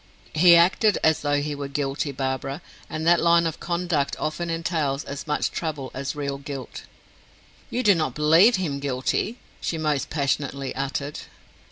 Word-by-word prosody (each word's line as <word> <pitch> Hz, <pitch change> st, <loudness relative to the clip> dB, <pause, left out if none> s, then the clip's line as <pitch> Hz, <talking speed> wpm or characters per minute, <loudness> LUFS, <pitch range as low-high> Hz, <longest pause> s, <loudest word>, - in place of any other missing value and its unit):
"He 170 Hz, +2 st, +7 dB
acted 185 Hz, +5 st, +4 dB
as 160 Hz, -1 st, +4 dB
though 145 Hz, -1 st, +1 dB
he 150 Hz, 0 st, -3 dB
were 140 Hz, -1 st, -5 dB
guilty, 140 Hz, +1 st, -2 dB
Barbara; 135 Hz, +3 st, -3 dB, 0.3 s
and 155 Hz, +1 st, -4 dB
that 170 Hz, 0 st, +5 dB
line 170 Hz, 0 st, +4 dB
of 165 Hz, -1 st, -3 dB
conduct 170 Hz, -5 st, -1 dB
often 160 Hz, +3 st, -3 dB
entails 160 Hz, -4 st, -1 dB
as 140 Hz, +3 st, -7 dB
much 150 Hz, -, 0 dB
trouble 150 Hz, -5 st, -4 dB
as 135 Hz, +2 st, -4 dB
real 140 Hz, -1 st, -3 dB
guilt." 140 Hz, -3 st, -7 dB, 0.8 s
"You 250 Hz, -, -1 dB
do 205 Hz, -, +6 dB
not 155 Hz, -7 st, -1 dB
believe 165 Hz, +10 st, +5 dB
him 160 Hz, -7 st, -2 dB
guilty?" 140 Hz, -, -1 dB, 0.2 s
she 165 Hz, -, -2 dB
most 150 Hz, -3 st, -1 dB
passionately 140 Hz, -2 st, -1 dB
uttered. 140 Hz, +2 st, -3 dB
150 Hz, 160 wpm, -24 LUFS, 140-170 Hz, 0.8 s, He